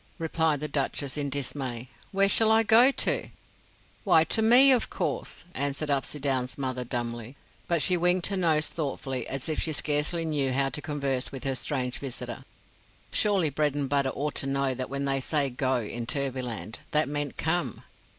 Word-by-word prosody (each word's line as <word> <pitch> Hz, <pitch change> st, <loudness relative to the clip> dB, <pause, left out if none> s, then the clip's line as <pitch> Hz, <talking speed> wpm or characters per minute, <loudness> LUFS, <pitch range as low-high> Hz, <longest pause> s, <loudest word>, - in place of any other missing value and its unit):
replied 160 Hz, -3 st, 0 dB
the 150 Hz, -, -4 dB
Duchess 140 Hz, -1 st, -2 dB
in 145 Hz, -1 st, -2 dB
dismay; 130 Hz, -3 st, -4 dB, 0.2 s
"where 195 Hz, 0 st, +3 dB
shall 220 Hz, +2 st, +5 dB
I 225 Hz, 0 st, +5 dB
go 230 Hz, +4 st, +6 dB
to?" 275 Hz, -, 0 dB, 0.7 s
"Why, 170 Hz, -6 st, +5 dB
to 220 Hz, -, +1 dB
me, 245 Hz, +5 st, +7 dB
of 250 Hz, -3 st, +2 dB
course," -, -, -3 dB
answered 145 Hz, +2 st, -2 dB
Upsydoun's 135 Hz, -2 st, 0 dB
mother, 130 Hz, -2 st, -3 dB
dumbly; 120 Hz, 0 st, -4 dB, 0.3 s
but 170 Hz, -3 st, +2 dB
she 185 Hz, -, +5 dB
winked 180 Hz, +1 st, +2 dB
her 200 Hz, -, +1 dB
nose 160 Hz, -4 st, +2 dB
thoughtfully, 135 Hz, -5 st, -3 dB
as 135 Hz, -1 st, -4 dB
if 155 Hz, -, -2 dB
she 160 Hz, -, 0 dB
scarcely 150 Hz, +3 st, 0 dB
knew 140 Hz, -4 st, 0 dB
how 135 Hz, +1 st, +1 dB
to 150 Hz, -, -4 dB
converse 140 Hz, -4 st, -2 dB
with 135 Hz, -, -7 dB
her 135 Hz, -, 0 dB
strange 125 Hz, -2 st, -3 dB
visitor. 135 Hz, -3 st, -6 dB, 0.7 s
Surely 195 Hz, -7 st, +2 dB
Bredenbutta 140 Hz, -2 st, 0 dB
ought 150 Hz, +2 st, -2 dB
to 135 Hz, -, -1 dB
know 135 Hz, -1 st, 0 dB
that 130 Hz, 0 st, -5 dB
when 140 Hz, +1 st, -3 dB
they 135 Hz, 0 st, +1 dB
said 140 Hz, -2 st, 0 dB
"go" 130 Hz, 0 st, +1 dB
in 120 Hz, +1 st, -5 dB
Turvyland, 130 Hz, -6 st, -3 dB
they 150 Hz, +1 st, +3 dB
meant 145 Hz, -1 st, -3 dB
"come." 160 Hz, -, -1 dB
140 Hz, 170 wpm, -27 LUFS, 130-160 Hz, 0.7 s, me